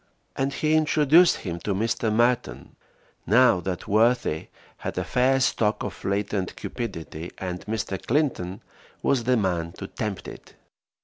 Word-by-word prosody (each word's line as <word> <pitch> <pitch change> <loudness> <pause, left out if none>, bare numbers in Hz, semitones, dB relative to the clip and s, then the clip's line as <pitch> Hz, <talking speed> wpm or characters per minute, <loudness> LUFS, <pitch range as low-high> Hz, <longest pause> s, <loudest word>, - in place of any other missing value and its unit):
And 135 +1 0
he 155 +3 0
introduced 155 +2 +5
him 85 -3 -5
to 100 +2 -2
Mr. 110 +1 0
Merton. 120 +2 0 0.5
Now 115 0 +5
that 90 0 -4
worthy 110 -6 +2 0.3
had - - -5
a - - 0
fair 130 +2 +2
stock 110 -4 +1
of - - -6
latent 100 -1 -1
cupidity, 85 -8 -6
and 90 -1 -5
Mr. 100 -3 -3
Clinton 115 - -1 0.4
was 130 -4 +1
the 125 0 +3
man 85 -5 -1
to 95 - -8
tempt 105 -1 -5
it. - - -11
110 Hz, 140 wpm, -25 LUFS, 95-125 Hz, 0.5 s, introduced